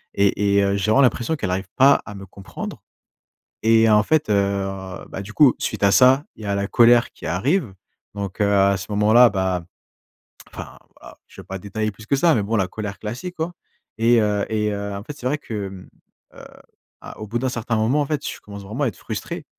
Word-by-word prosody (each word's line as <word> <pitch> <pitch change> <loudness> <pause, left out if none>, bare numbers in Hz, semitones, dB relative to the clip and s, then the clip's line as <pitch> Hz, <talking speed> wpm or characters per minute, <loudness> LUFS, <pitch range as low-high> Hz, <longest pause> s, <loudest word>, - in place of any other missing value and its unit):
et 100 0 +2
et 100 - +4
heu, 100 0 +1
j'ai 100 +2 0
vraiment 135 - +5
l'impression 125 +4 +1
qu'elle 95 -8 -3
arrive 95 +2 -3
pas 140 +1 +5
à 105 - -8
me 95 -1 -9
comprendre 95 +1 -9 0.8
et 115 0 +4
en 105 -1 +5
fait, 155 -4 +1
heu, 105 - +3 0.7
bah, 95 - -6
du 100 +2 -9
coup, 145 -5 +5
suite - - -4
à 100 - +5
ça, 130 +9 +5
il 110 - -12
y - - -6
a 100 0 -1
la 100 0 -1
colère 120 +1 +4
qui - - -12
arrive. 115 - 0 0.4
Donc, 100 0 -5
heu, 100 0 +2
à 100 0 +4
ce 95 - -8
moment-là, 110 +4 +5
bah 95 -3 -1 0.9
enfin - - -9 0.2
voilà, - - -14
je - - -14
vais - - -12
pas 95 0 -6
détailler 110 +3 -3
plus 110 +2 -14
que 140 - +1
ça 165 +3 +3
mais 105 - +1
bon, 110 +3 -1
la 95 -3 +1
colère 100 -1 -6
classique 125 +12 -6
quoi 165 +2 -3 0.4
et, 115 +1 +4
heu 105 -1 0
et 105 -1 0
heu, 100 0 -4
en 100 - -6
fait, 145 +3 -8
c'est 125 - -7
vrai 145 +3 0
que, 105 -7 -5
mmh, 95 -1 -12 0.5
heu, - - -12 0.6
a - - -11
au 110 - -6
bout 115 +3 -2
d'un 130 +1 -1
certain 115 -1 -2
moment, 115 +7 +1
en 145 - 0
fait, 150 -1 -3
je - - -6
commence 100 -1 -10
vraiment 120 +9 -3
à - - +1
être - - -7
frustré - - -6
105 Hz, 230 wpm, -21 LUFS, 100-120 Hz, 0.9 s, vraiment